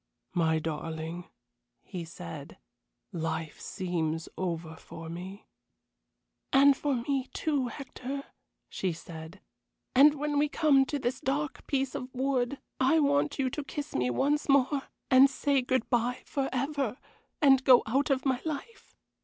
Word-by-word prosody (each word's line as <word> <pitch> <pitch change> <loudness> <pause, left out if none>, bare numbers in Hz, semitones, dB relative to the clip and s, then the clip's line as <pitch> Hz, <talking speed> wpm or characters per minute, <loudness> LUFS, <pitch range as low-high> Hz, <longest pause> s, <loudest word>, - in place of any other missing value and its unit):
"My 160 -3 +2
darling," 160 +2 -4 0.6
he 175 -3 -6
said, 85 - -9 0.5
"life 165 -2 -3
seems 165 -4 -2
over 165 -3 -3
for 165 0 -10
me." 185 +4 -8 1.1
"And 275 +1 +7
for 285 0 0
me, 260 +2 -1
too, 285 -5 0
Hector," 270 +2 -6 0.4
she 185 -3 -2
said. 160 +2 -10 0.5
"And 290 +3 +7
when 295 0 0
we 295 0 +2
come 285 -3 +4
to 290 - -2
this 255 -2 -2
dark 290 +2 -2
piece 270 -2 0
of 255 0 -5
wood 260 0 0 0.2
I 265 +5 +4
want 285 -1 +2
you 265 -2 0
to 295 - -3
kiss 285 +1 -6
me 125 -1 +1
once 290 - +1
more 275 0 +3 0.2
and 260 +1 +8
say 280 0 +1
good 255 -1 0
bye 245 +1 +1
forever, 270 -2 -1 0.4
and 270 -4 +5
go 255 -2 +7
out 270 +7 +1
of 270 -1 +1
my 260 -2 +1
life." 320 +9 -6
260 Hz, 140 wpm, -29 LUFS, 175-280 Hz, 1.1 s, and